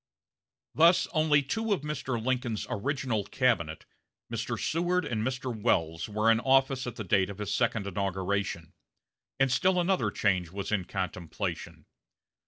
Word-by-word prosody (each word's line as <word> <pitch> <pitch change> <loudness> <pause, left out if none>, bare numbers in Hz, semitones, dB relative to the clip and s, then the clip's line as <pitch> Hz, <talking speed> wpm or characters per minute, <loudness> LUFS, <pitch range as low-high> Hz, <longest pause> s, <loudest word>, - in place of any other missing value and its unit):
Thus 170 +3 +5
only 155 -3 +3
two 220 +10 -1
of 190 - -2
Mr. 145 -5 -3
Lincoln's 120 -2 -1
original 130 -2 -1
cabinet, 95 -10 0 0.5
Mr. 115 0 -3
Seward 175 - 0
and 110 -3 -2
Mr. 130 +1 -2
Welles, 85 -4 0
were 105 +2 +3
in 115 - +3
office 135 0 +2
at 120 - -5
the 110 - -5
date 95 0 +2
of 100 - -7
his 105 -1 -3
second 115 -4 0
inauguration; 95 -3 -2 0.7
and 135 -1 +3
still 185 +7 +3
another 175 - +1
change 95 -5 0
was 100 +3 -5
in 100 -4 0
contemplation. 95 -3 -4
115 Hz, 145 wpm, -29 LUFS, 100-135 Hz, 0.7 s, Thus